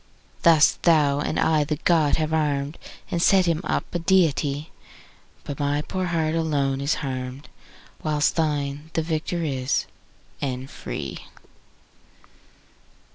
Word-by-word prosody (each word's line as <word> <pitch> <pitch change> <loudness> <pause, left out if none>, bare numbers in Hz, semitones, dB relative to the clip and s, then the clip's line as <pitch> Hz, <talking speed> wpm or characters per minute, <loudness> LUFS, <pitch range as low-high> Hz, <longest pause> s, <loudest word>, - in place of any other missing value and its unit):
Thus 160 -4 +5
thou 150 -4 +4
and 150 - -1
I 155 -2 +3
the 150 +1 -1
god 155 -1 +3
have 155 0 -1
arm'd 145 -1 0 0.3
And 170 - 0
set 190 +1 +5
him 165 -1 +1
up - - -1
a 175 - 0
deity; 155 -4 +1 0.7
But 145 - -6
my 145 +1 0
poor 185 +2 -3
heart 160 -3 0
alone 145 -4 0
is 140 +3 +1
harm'd, 130 +1 -5 0.5
15 - - -25
Whilst 150 -1 +1
thine 150 -1 -1
the 160 - 0
victor 165 +2 -2
is, 135 -3 -1 0.6
and 130 -1 -3
free! 70 -4 -6
150 Hz, 130 wpm, -24 LUFS, 140-165 Hz, 0.7 s, Thus